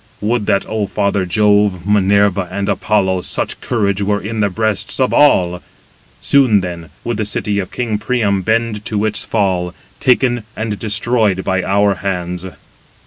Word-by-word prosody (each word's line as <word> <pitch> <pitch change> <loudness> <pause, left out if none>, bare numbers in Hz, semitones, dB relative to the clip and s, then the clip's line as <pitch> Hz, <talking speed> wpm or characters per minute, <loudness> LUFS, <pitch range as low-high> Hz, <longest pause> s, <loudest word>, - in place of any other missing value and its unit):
Would 110 0 -1
that, 100 - +1
O 110 -2 -2
father 100 -2 -1
Jove, 105 -2 +2
Minerva, 100 -2 +2
and 100 0 -3
Apollo, 95 -4 +1
such - - -1
courage 100 -4 -1
were 105 +1 0
in 110 +3 -5
the 100 -1 +2
breasts 110 +4 -1
of 130 - +1
all; 90 -12 +3 0.6
soon 125 -8 +4
then 85 -3 -6
would 120 -2 -3
the 110 - -1
city 105 0 -2
of 95 - -4
king 115 -4 -2
Priam 105 -3 0
bend 110 +1 -1
to 105 0 -1
its 105 -1 +1
fall, 90 -5 -1 0.2
taken 125 -1 +2
and 110 -2 -4
destroyed 110 -3 +1
by 95 0 0
our 100 +2 +2
hands." 90 -2 -3
105 Hz, 155 wpm, -16 LUFS, 95-110 Hz, 0.6 s, soon